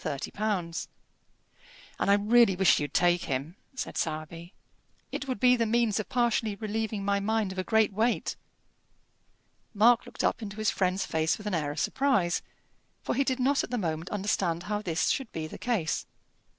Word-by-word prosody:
"And 170 +8 -3 1.5
I 200 - +3
really 210 0 +4
wish 190 -1 +4
you'd 145 -1 -3
take 175 0 +2
him," 140 +6 -3 0.2
said 255 - -5
Sowerby. 165 +2 -4 0.6
"It 280 - -4
would 255 -5 -3
be 250 +2 +5
the 230 -2 0
means 225 -2 +2
of 215 - -4
partially 235 -4 +1
relieving 215 -1 -3
my 200 0 +2
mind 215 -1 0
of 190 - -5
a - - 0
great 220 0 +2
weight." 225 +4 0 1.4
Mark 230 +3 +5
looked - - -5
up - - +1
into 205 -2 -6
his 215 0 +1
friend's 185 0 0
face 160 0 0
with 210 - -12
an 210 - -2
air 155 -4 0
of 145 +2 -4
surprise, 255 - +1 0.6
for - - -1
he 275 - +2
did 260 -1 -1
not 275 +2 +2
at - - -5
the 245 - -2
moment 165 -3 -3
understand 190 -4 -1
how 210 +1 -2
this 165 -5 0
should 265 -4 -1
be 160 -1 -4
the 155 - -9
case. 210 -11 -1
205 Hz, 175 wpm, -28 LUFS, 175-225 Hz, 1.5 s, be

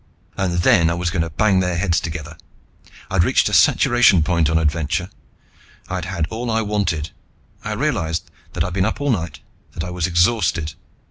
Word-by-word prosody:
And 90 -3 -1
then 85 -1 +4
I 85 - 0
was 85 0 -2
going 85 - -1
to 80 - -2
bang 95 +4 +2
their 90 -2 0
heads 85 -2 +1
together. 80 -2 -6 0.8
I'd 95 -2 +3
reached - - +2
a - - -6
saturation 120 -9 +4
point 85 -2 +1
on 80 - +2
adventure. 80 +3 -1 0.8
I'd 90 -1 -3
had 90 -3 -2
all 120 +2 -4
I 110 0 +1
wanted. 90 -6 -1 0.5
I - - -3
realized 85 +2 -2 0.2
that 85 - -1
I'd 90 0 -4
been 95 0 +1
up 110 +6 -2
all 145 -1 0
night, 85 -8 -3 0.3
that 80 - -5
I 90 - -5
was 90 -2 -1
exhausted. 85 -3 +1
85 Hz, 185 wpm, -20 LUFS, 80-95 Hz, 0.8 s, then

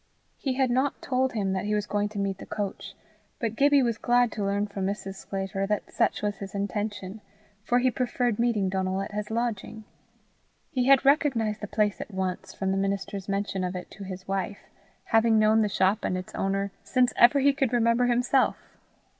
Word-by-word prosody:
He 270 - -1
had 260 -2 +2
not 260 +3 +1
told 260 0 0
him 195 -4 -1
that 190 +1 -2
he 210 0 0
was 210 -1 -1
going 205 0 -1
to 210 - -9
meet 195 -1 -2
the - - -8
coach, 205 -2 -5 0.4
but 225 -2 -2
Gibbie 285 0 +4
was 235 -3 -1
glad 245 0 +3
to 210 - -3
learn 200 +1 0
from 200 -2 -3
Mrs. 195 -1 -4
Sclater 195 0 -4
that 210 -1 -2
such - - +1
was 205 -1 -1
his 195 0 -8
intention, 205 0 -3 0.4
for 240 +3 +2
he 255 +1 +3
preferred 245 -3 -1
meeting 230 -5 +2
Donal 190 0 -1
at - - -7
his 210 0 -4
lodging. 220 -1 -3 0.9
He 250 -1 0
had 275 0 +6
recognized 250 -7 +2
the 210 - -4
place 210 0 0
at - - -7
once 190 -1 -3
from 190 -1 -2
the 195 - 0
minister's 195 0 -2
mention 195 -1 -1
of 180 0 -3
it 180 - -7
to 200 - -9
his 185 -1 -8
wife, 195 +1 -3 0.4
having 225 0 +3
known 215 +1 +4
the 210 - +1
shop 190 +2 +1
and 185 - 0
its 185 - -7
owner 195 0 -1
since 255 -2 +2
ever 245 +4 +6
he 280 +1 +4
could 270 -3 0
remember 235 0 +3
himself. 250 +2 +2
210 Hz, 200 wpm, -27 LUFS, 195-240 Hz, 0.9 s, had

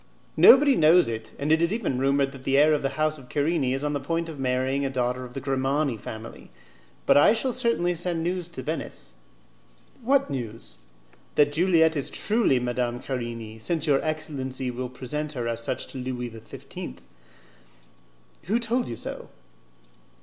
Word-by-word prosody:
"Nobody 275 0 +7
knows 165 +1 +5
it, 110 -1 -5
and 145 +2 -1
it 160 +1 +4
is 170 +1 +2
even 200 - -1
rumoured 135 +1 +2
that 135 -2 -12
the 135 +1 +2
heir 150 +2 +6
of 150 - +1
the 135 0 -3
house 155 0 0
of 125 -2 -15
Querini 145 -2 0
is 135 +2 -3
on 150 0 -1
the 145 - -1
point 165 +4 -2
of 155 -3 -8
marrying 130 +1 0
a 135 - 0
daughter 125 -1 -1
of 125 -1 -11
the - - -2
Grimani 135 0 0
family; 110 +1 -9 0.6
but - - +5
I 145 - +6
shall 250 +2 -1
certainly 235 -8 +1
send 175 0 -2
the 165 - -2
news 180 0 -2
to 175 - -8
Venice." - - -5 0.9
"What 265 - +2
news?" 115 -4 -6 0.6
"That 145 -1 +4
Juliette 160 0 +3
is 140 - -2
truly 215 - +2
Madame 120 0 -2
Querini, 115 -4 -5
since 160 +6 -1
your 140 -3 +2
excellency 135 -5 -3
will 125 +1 -5
present 145 +4 -5
her 120 -4 -3
as 115 0 -2
such - - -2
to 135 - -7
Louis 125 -1 -4
XV." 110 - -9 1.5
"Who 210 +6 +1
told 240 +1 -1
you 115 - -4
so?" - - -7
140 Hz, 180 wpm, -26 LUFS, 125-165 Hz, 1.5 s, Nobody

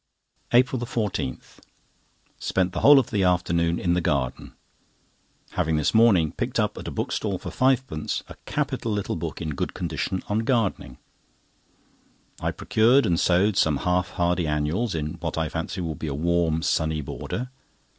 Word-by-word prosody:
APRIL 125 +1 +4
14.—Spent 95 - -5
the 90 - -2
whole 145 +7 +8
of 130 - +2
the 105 -3 +1
afternoon 85 -2 +1
in 85 -1 +1
the 90 - +1
garden, 70 -6 -2 1.0
having 80 0 0
this 75 - +1
morning 105 -9 +5
picked - - -2
up - - 0
at - - -8
a - - -2
bookstall 100 -3 -2
for - - -7
fivepence 130 -11 0
a - - -9
capital 115 - -2
little 105 -1 -2
book, 85 0 -5
in 80 -2 -3
good - - -3
condition, 95 - -3
on 105 +1 0
Gardening. 110 - -1 1.4
I - - -1
procured 120 +6 +3
and 85 -1 +1
sowed 95 +3 +3
some 75 -3 +3
half 90 +2 0
hardy 90 -1 +1
annuals 75 +9 -1
in 75 +2 -4
what 85 -1 -4
I 80 -1 0
fancy 90 - -4
will 80 -2 -2
be 80 - -6
a 70 - -3
warm, 85 0 +1
sunny 80 -2 0
border. 125 - -5
90 Hz, 155 wpm, -25 LUFS, 80-110 Hz, 1.4 s, whole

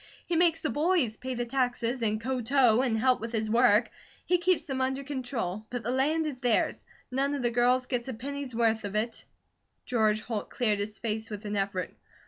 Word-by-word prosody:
He 345 - -1
makes 330 -1 +3
the 310 - -1
boys 300 -7 +1
pay 260 0 -4
the 240 0 -2
taxes, 245 -1 -1
and 215 -1 0
ko 255 +2 -2
tow, 245 -1 +4
and 240 -4 +1
help 255 +3 +3
with 230 0 -4
his 220 -1 -1
work; 235 -1 +4 0.3
he 360 0 +2
keeps 350 -3 +2
them 265 -4 -2
under 265 +1 -1
control; 245 -7 -4
but 245 -2 -4
the 240 - -1
land 300 +5 +1
is 285 -5 -4
theirs; 245 -3 +1 0.3
none 275 +2 0
of 275 - -3
the 240 - +1
girls 250 +2 +3
get 250 -1 -2
a 260 - -3
penny's 275 +1 -5
worth 225 -1 +2
of 205 0 -5
it!" 225 +2 -1 0.6
George 215 -3 +2
Holt 220 -4 -4
cleared 215 -4 +1
his 210 +1 -3
face 220 -1 -3
with 210 0 -7
an 205 0 -3
effort. 195 -2 -2
245 Hz, 210 wpm, -29 LUFS, 220-270 Hz, 0.6 s, tow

